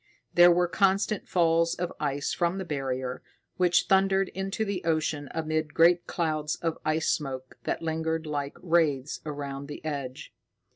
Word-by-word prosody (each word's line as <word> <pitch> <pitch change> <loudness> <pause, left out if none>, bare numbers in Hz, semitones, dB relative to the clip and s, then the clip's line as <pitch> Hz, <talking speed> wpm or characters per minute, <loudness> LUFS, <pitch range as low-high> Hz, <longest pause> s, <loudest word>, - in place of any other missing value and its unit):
There 175 0 +8
were 175 +1 +3
constant 195 +3 +1
falls 165 -1 +2
of 180 0 -3
ice 145 -1 -1
from 175 +2 0
the 190 - -4
Barrier, 130 -4 -3 0.4
which 180 -1 +3
thundered 195 0 +3
into 195 +3 -3
the 200 -3 -3
ocean 155 -3 -1
amid 155 -1 -2
great 170 +1 +5
clouds 155 -3 -1
of 165 -1 -3
ice 155 +1 +1
smoke 130 -3 -3
that - - -2
lingered 160 0 -1
like 145 -2 -3
wraiths 155 -5 +1
around 140 -1 -5
the 150 +1 -9
edge. 140 -4 -5
160 Hz, 150 wpm, -28 LUFS, 145-175 Hz, 0.4 s, There